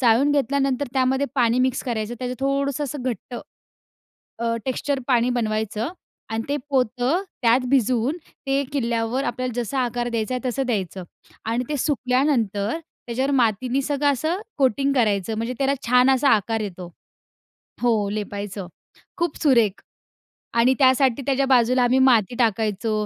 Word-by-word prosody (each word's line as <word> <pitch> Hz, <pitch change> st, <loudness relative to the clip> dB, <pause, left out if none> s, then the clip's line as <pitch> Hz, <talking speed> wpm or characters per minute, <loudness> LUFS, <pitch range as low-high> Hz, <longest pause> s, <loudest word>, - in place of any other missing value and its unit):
चाळून 250 Hz, +3 st, +4 dB
घेतल्यानंतर 280 Hz, 0 st, +1 dB
त्यामध्ये 265 Hz, +1 st, +1 dB
पाणी 240 Hz, -2 st, +2 dB
मिक्स 255 Hz, 0 st, +1 dB
करायचं, 230 Hz, -2 st, -3 dB
त्याचं 250 Hz, 0 st, -3 dB
थोडंसं 275 Hz, +1 st, 0 dB
असं 280 Hz, -1 st, -5 dB
घट्ट 245 Hz, -1 st, -4 dB, 1.0 s
अ, 230 Hz, 0 st, -1 dB
टेक्स्चर 275 Hz, +2 st, -1 dB
पाणी 245 Hz, -1 st, +3 dB
बनवायचं 220 Hz, -1 st, -1 dB, 0.4 s
आणि 225 Hz, 0 st, -1 dB
ते 285 Hz, -, 0 dB
पोतं 255 Hz, -, +1 dB, 0.2 s
त्यात 235 Hz, +2 st, +4 dB
भिजवून 255 Hz, +2 st, +2 dB, 0.3 s
ते 275 Hz, +1 st, +1 dB
किल्ल्यावर 235 Hz, -1 st, -1 dB
आपल्याला 255 Hz, -3 st, -2 dB
जसा 265 Hz, +4 st, -3 dB
आकार 240 Hz, 0 st, -2 dB
द्यायचा 230 Hz, +1 st, -2 dB
आहे 255 Hz, +1 st, -2 dB
तसं 265 Hz, +2 st, -1 dB
द्यायचं. 190 Hz, -5 st, -2 dB, 0.4 s
आणि 230 Hz, +3 st, -1 dB
ते 300 Hz, -, -1 dB
सुकल्यानंतर, 250 Hz, -, 0 dB, 0.3 s
त्याच्यावर 260 Hz, +4 st, -1 dB
मातीनी 250 Hz, +1 st, +1 dB
सगळं 285 Hz, +1 st, +1 dB
असं 315 Hz, +8 st, -1 dB, 0.2 s
कोटिंग 275 Hz, +1 st, +2 dB
करायचं, 220 Hz, -4 st, +1 dB
म्हणजे 230 Hz, +3 st, -3 dB
त्याला 275 Hz, 0 st, +2 dB
छान 250 Hz, +2 st, +5 dB
असा 270 Hz, +1 st, +3 dB
आकार 225 Hz, +1 st, +2 dB
येतो. 185 Hz, -4 st, -6 dB, 0.9 s
हो, 220 Hz, -4 st, +2 dB
लेपायचं. 205 Hz, -2 st, -5 dB, 0.5 s
खूप 340 Hz, -3 st, -1 dB
सुरेख! 235 Hz, -9 st, +3 dB, 0.7 s
आणि 235 Hz, +2 st, +4 dB
त्यासाठी 260 Hz, -1 st, +4 dB
त्याच्या 275 Hz, 0 st, +1 dB
बाजूला 250 Hz, -1 st, +4 dB
आम्ही 250 Hz, +2 st, +3 dB
माती 245 Hz, -4 st, +4 dB
टाकायचो, 215 Hz, -1 st, 0 dB
250 Hz, 140 wpm, -23 LUFS, 225-270 Hz, 1.0 s, छान